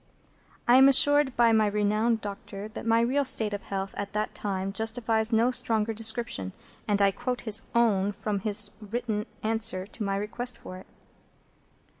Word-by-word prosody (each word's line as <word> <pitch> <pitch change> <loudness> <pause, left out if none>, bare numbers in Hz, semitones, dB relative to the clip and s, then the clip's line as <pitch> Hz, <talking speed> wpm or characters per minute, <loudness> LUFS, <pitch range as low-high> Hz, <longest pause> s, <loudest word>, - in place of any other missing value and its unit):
I 245 +1 +6
am 265 +1 +7
assured 290 0 +4
by 235 -1 +4
my 220 -1 +3
renowned 210 +2 0
doctor 200 0 -8
that 220 - -8
my 230 0 +3
real 265 +5 +1
state 220 -5 +2
of 205 - -4
health 195 0 -5
at 200 0 -6
that 215 0 -3
time 195 -2 -4
justifies 220 0 -1
no 230 +2 +2
stronger 225 -3 -1
description, 220 - -2 0.3
and 205 -1 +1
I 195 - +4
quote 245 +4 -4
his 220 -1 0
own 205 -4 +2
from 205 0 -4
his 210 +1 +6
written 215 0 -4 0.2
answer 220 -4 -1
to 220 - -13
my 195 -1 -2
request 235 +5 -3
for 185 - -10
it. 185 - -14
220 Hz, 170 wpm, -26 LUFS, 205-235 Hz, 0.3 s, am